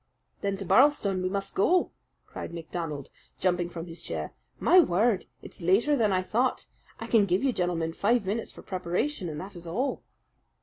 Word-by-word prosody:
"Then 200 -1 -1
to 195 - -6
Birlstone 200 -2 +4
we 185 - 0
must 195 0 -3
go!" 355 - +3 0.3
cried 170 - -7
MacDonald, 160 -4 -5 0.3
jumping 175 -1 +1
from 170 -1 -6
his 165 -1 -9
chair. - - -5 0.3
"My 370 - +6
word! 215 - +2 0.2
it's - - -11
later 200 - +3
than 220 -6 +2
I 185 -1 +1
thought. 245 +7 0 0.3
I - - -5
can 215 -4 +3
give 180 +4 +1
you, 270 -2 +2
gentlemen, 170 -4 -1
five 220 +4 +2
minutes 215 +4 -2
for - - -13
preparation, 185 - -2
and 150 -1 -5
that 195 +3 -8
is 170 0 -7
all." 250 +12 -1
190 Hz, 180 wpm, -28 LUFS, 175-230 Hz, 0.3 s, My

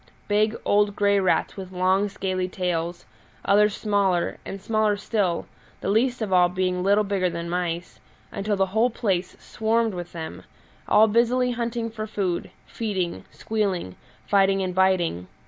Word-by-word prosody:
Big, 215 +2 +2
old, 205 0 +3
grey 200 0 +3
rats 185 -2 +1
with 190 -2 -8
long, 190 +2 +2
scaly 185 -2 -2
tails, 175 -2 -3 0.4
others 210 +1 +4
smaller, 200 -5 0
and 195 - -6
smaller 215 0 +1
still, 200 -4 -1 0.4
the - - -2
least 240 +2 +1
of 195 -3 -2
all 180 -1 +5
being 180 0 -1
little 200 +3 +3
bigger 195 -3 0
than 170 0 -5
mice, 175 0 -3 0.3
until 205 +1 -1
the 195 0 +2
whole 225 +3 +3
place 190 -6 -2
swarmed 225 0 0
with 175 -1 -6
them, 160 -2 -7 0.5
all 215 +1 +6
busily 240 +3 +2
hunting 235 -1 -2
for 215 0 -5
food, 190 -5 -2 0.2
feeding, 190 -6 -3
squealing, 195 - -2 0.3
fighting, 195 -1 +3
and 185 -1 -2
biting. 180 - +1
195 Hz, 150 wpm, -24 LUFS, 180-215 Hz, 0.5 s, all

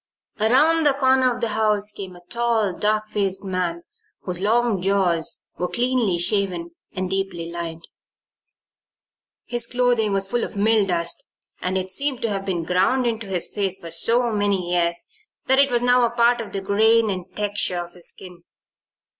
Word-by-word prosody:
Around 300 +9 +4
the 280 - +3
corner 260 -2 +3
of 245 0 -5
the 230 - 0
house 210 -1 +1
came 190 -3 -8
a 175 0 -16
tall, 230 -5 0
dark 215 +2 +1
faced 195 -2 -1
man 180 -3 -2 0.4
whose 180 -2 -4
long 220 0 +1
jaws 185 -4 +1 0.2
were 180 - 0
cleanly 240 -5 +1
shaven 175 -2 +1 0.2
and 185 0 -3
deeply 185 -3 -3
lined. 165 -1 -6 1.6
His 240 -1 -1
clothing 245 -4 +1
was 195 0 +1
full 240 +4 -1
of - - -5
milldust 200 -5 +1 0.4
and 185 +1 -1
it 185 0 -3
seemed 275 +3 -1
to 230 - 0
have 195 -1 -3
been 180 -4 -2
ground 190 +10 +1
into 225 -2 -2
his 185 -3 -1
face 195 -3 -2
for 170 -4 -10
so 230 +8 +2
many 200 -4 0
years 170 -1 +1 0.4
that 265 +1 +3
it 280 0 +5
was 240 -1 0
now 245 0 +4
a 235 - +3
part 235 0 +2
of 220 - -8
the 195 - -3
grain 220 +2 +3
and 185 -2 -4
texture 205 -3 -1
of 175 0 -5
his 175 -1 -5
skin. 180 -2 -12
200 Hz, 170 wpm, -22 LUFS, 180-235 Hz, 1.6 s, it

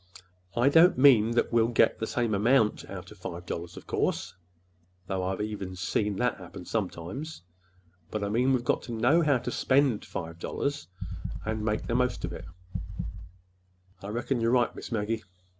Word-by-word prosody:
I 120 +3 +4
don't 165 +2 +6
mean 125 -5 +7
that 120 - +1
we'll 115 -1 +5
get 115 - +3
the 110 - -2
same 120 -3 0
amount 110 +2 +3
out 95 -1 -8
of 105 - -14
five 90 -1 -6
dollars, 85 0 -5
of - - -10
course,—though 90 +1 -4
I've 95 +1 -1
seen 105 +1 -2 0.6
even 105 - -2
that - - +1
happen - - -10
sometimes!—but 90 - -6
I - - 0
mean 120 +5 +2
that 135 - +5
we've 120 - -7
got - - +2
to 120 - -7
know 125 +9 +4
how 145 -4 +4
to 125 - -4
spend 130 -5 +2
five 85 0 -6
dollars—and 110 - -4
to - - -4
make 105 0 0
the 115 - -2
most 125 +1 +1
of - - -5
it." - - -7 1.6
"I 100 - -7
reckon—you're 115 +2 0
right, 120 0 +3
Miss - - -8
Maggie." 110 0 -1
110 Hz, 170 wpm, -28 LUFS, 90-125 Hz, 1.6 s, mean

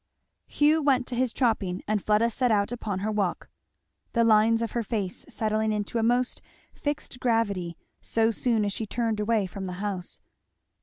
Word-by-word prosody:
Hugh 305 +2 +3
went 270 -4 +3
to 250 - -5
his 250 -1 +1
chopping 215 -8 0
and 210 -2 0
Fleda 215 +2 +3
set 250 +1 +1
out 205 0 +2
upon 210 -6 -3
her 215 +2 -1
walk; 200 -4 -2 0.6
the 235 - +3
lines 225 +1 +4
of 230 - -3
her 235 - -1
face 205 -4 -3
settling 215 0 0
into 210 +2 -2
a - - +1
most 245 +2 +1 0.3
fixed 290 -3 -4
gravity 200 -8 0 0.2
so 225 0 +1
soon 225 -2 +1
as 200 - -1
she 220 - -4
turned 225 -1 -1
away 210 -1 +1
from 190 +1 -6
the 180 - -4
house. 190 -1 -4
220 Hz, 175 wpm, -27 LUFS, 205-235 Hz, 0.6 s, lines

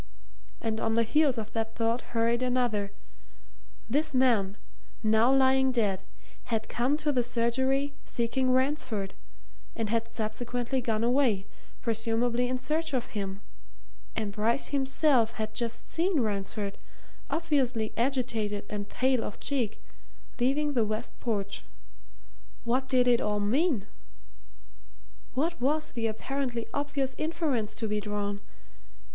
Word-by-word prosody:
And 220 -1 -1
on 225 0 +1
the 230 - +4
heels 285 +2 +3
of 220 -1 -5
that 225 -1 -2
thought 230 +1 +1
hurried 235 +1 +1
another 245 -5 +1 1.0
this 295 +4 +1
man, 220 -6 +3 0.5
now 220 +3 +5
lying 265 0 +5
dead, 205 -6 +1 0.4
had 225 -2 -1
come 255 +5 +1
to 305 -1 0
the 255 -3 +2
surgery, 260 +4 +1
seeking 255 +2 0
Ransford, 255 -6 +1 0.6
and 220 -2 -2
had 230 0 +1
subsequently 245 +3 -2
gone 225 -2 0
away, 240 -5 +3 0.4
presumably 235 +2 +1
in 255 - 0
search 310 +2 -1
of 245 - -2
him, 195 -1 -4 0.7
and 215 -2 -1
Bryce 220 +6 +1
himself 265 -4 +3
had 215 0 -3
just 230 +1 -4
seen 340 -1 +2
Ransford, 200 -1 -2 0.5
obviously 265 -9 +1
agitated 230 -5 0
and 205 -1 -4
pale 255 -2 +2
of 205 - -6
cheek, 250 -7 -1 0.6
leaving 290 +4 +2
the 240 -4 +3
west 215 +2 -4
porch; 200 -4 -2 1.0
what 255 +3 +1
did 250 -2 +4
it 240 -1 +5
all 210 0 0
mean? 240 - +2 1.5
what 325 +3 0
was 305 +4 +1
the 230 -2 -1
apparently 240 +1 -2
obvious 285 -2 -1
inference 310 -9 0
to 225 - -2
be 210 0 0
drawn? 205 -1 -2
235 Hz, 130 wpm, -29 LUFS, 220-265 Hz, 1.5 s, now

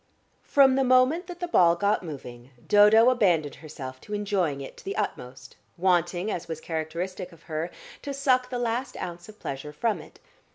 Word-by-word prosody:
From 270 -2 +5
the 270 - +3
moment 255 +7 +3
that 355 -1 -8
the 355 - -1
ball 175 - +5
got 200 +4 +1
moving 130 -7 -9 0.2
Dodo 215 +4 +6
abandoned 175 - +2
herself 130 -4 -8
to 210 - -5
enjoying 195 -8 -1
it 135 - -8
to - - -13
the 195 - -4
utmost, 130 -11 -5 0.2
wanting, 175 +2 +1
as 175 0 -4
was 160 -2 -5
characteristic 170 +4 -4
of 165 -1 -18
her, 160 +1 -3 0.3
to 285 - -5
suck 255 -2 +1
the 250 - -3
last 245 +2 -2
ounce 175 +2 -7
of 215 - -13
pleasure 140 -2 -6
from 215 +8 -1
it. - - -16
185 Hz, 180 wpm, -26 LUFS, 160-240 Hz, 0.3 s, Dodo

